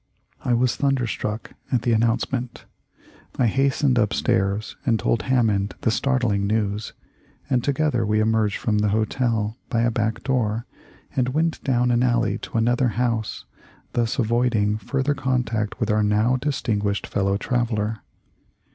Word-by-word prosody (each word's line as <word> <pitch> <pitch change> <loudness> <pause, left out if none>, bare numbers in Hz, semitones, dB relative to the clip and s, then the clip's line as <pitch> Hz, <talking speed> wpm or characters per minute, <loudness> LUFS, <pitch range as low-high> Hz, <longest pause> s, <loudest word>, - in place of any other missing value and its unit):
I 120 - +2
was 125 +1 +2
thunderstruck 120 -5 -1 0.2
at 120 -4 +1
the 120 - +1
announcement. 115 +2 0 0.7
I 125 - +3
hastened 135 +2 +2
upstairs 100 -1 0
and 115 -3 +2
told 115 - +1
Hammond 105 -6 +1
the 115 - +2
startling 115 -6 +1
news, 105 0 -1 0.6
and 125 -2 +2
together 140 -4 +1
we 105 0 +1
emerged 110 -1 +1
from 105 -2 0
the 105 - +2
hotel 110 +1 0
by 115 -4 +1
a 120 0 +2
back 110 -1 -1
door 115 -4 0 0.5
and 125 -1 +1
went 165 +1 0
down 125 -2 +2
an 120 0 +2
alley 120 -2 +1
to - - -5
another 120 +3 +2
house, 115 -2 -1 0.5
thus 115 +1 0
avoiding 115 -3 +1
fur 135 +6 -2
ther 145 +2 +1
contact 120 -6 -1
with 115 -3 0
our 105 0 +2
now 105 +4 +2
distinguished 110 -7 -1
fellow 100 0 0
traveller. 110 -2 -1
115 Hz, 145 wpm, -23 LUFS, 105-125 Hz, 0.7 s, I